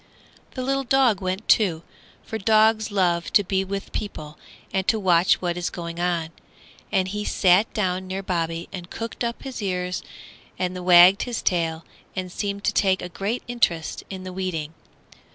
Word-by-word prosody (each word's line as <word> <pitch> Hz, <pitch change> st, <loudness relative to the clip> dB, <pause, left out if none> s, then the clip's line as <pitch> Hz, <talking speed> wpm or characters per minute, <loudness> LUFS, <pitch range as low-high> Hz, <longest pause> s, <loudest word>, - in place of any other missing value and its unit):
The 255 Hz, -, -3 dB
little 275 Hz, +1 st, 0 dB
dog 250 Hz, -6 st, +3 dB
went 185 Hz, +3 st, -3 dB
too, 170 Hz, -7 st, +3 dB, 0.4 s
for 220 Hz, -, -5 dB
dogs 220 Hz, +1 st, +3 dB
love 175 Hz, -4 st, +1 dB
to 205 Hz, -, +6 dB
be 190 Hz, 0 st, 0 dB
with 195 Hz, +1 st, -5 dB
people 155 Hz, -8 st, -6 dB, 0.3 s
and 190 Hz, -1 st, 0 dB
to 220 Hz, -, +3 dB
watch 180 Hz, -2 st, +3 dB
what 175 Hz, -1 st, -1 dB
is 175 Hz, -, -1 dB
going 170 Hz, 0 st, -6 dB
on; 175 Hz, -2 st, 0 dB, 0.6 s
and 190 Hz, 0 st, +1 dB
he 210 Hz, +2 st, -3 dB
sat 190 Hz, +1 st, +3 dB
down 185 Hz, -2 st, -1 dB
near 190 Hz, +1 st, -4 dB
Bobby 165 Hz, -2 st, -2 dB
and 180 Hz, -2 st, -7 dB
cocked 230 Hz, +1 st, -5 dB
up 235 Hz, 0 st, -3 dB
his 265 Hz, -4 st, -6 dB
ears 180 Hz, -2 st, -2 dB, 0.6 s
and 185 Hz, 0 st, -2 dB
wagged 180 Hz, +2 st, +7 dB
his 245 Hz, -2 st, -3 dB
tail 165 Hz, -3 st, 0 dB, 0.3 s
and 185 Hz, -1 st, -4 dB
seemed 200 Hz, +1 st, -3 dB
to 215 Hz, -, +1 dB
take 190 Hz, -3 st, +2 dB
a 180 Hz, -, -5 dB
great 200 Hz, +7 st, -3 dB
interest 175 Hz, -10 st, 0 dB
in 190 Hz, -1 st, -7 dB
the 185 Hz, 0 st, -7 dB
weeding. 170 Hz, -5 st, -3 dB
185 Hz, 170 wpm, -24 LUFS, 175-210 Hz, 0.6 s, wagged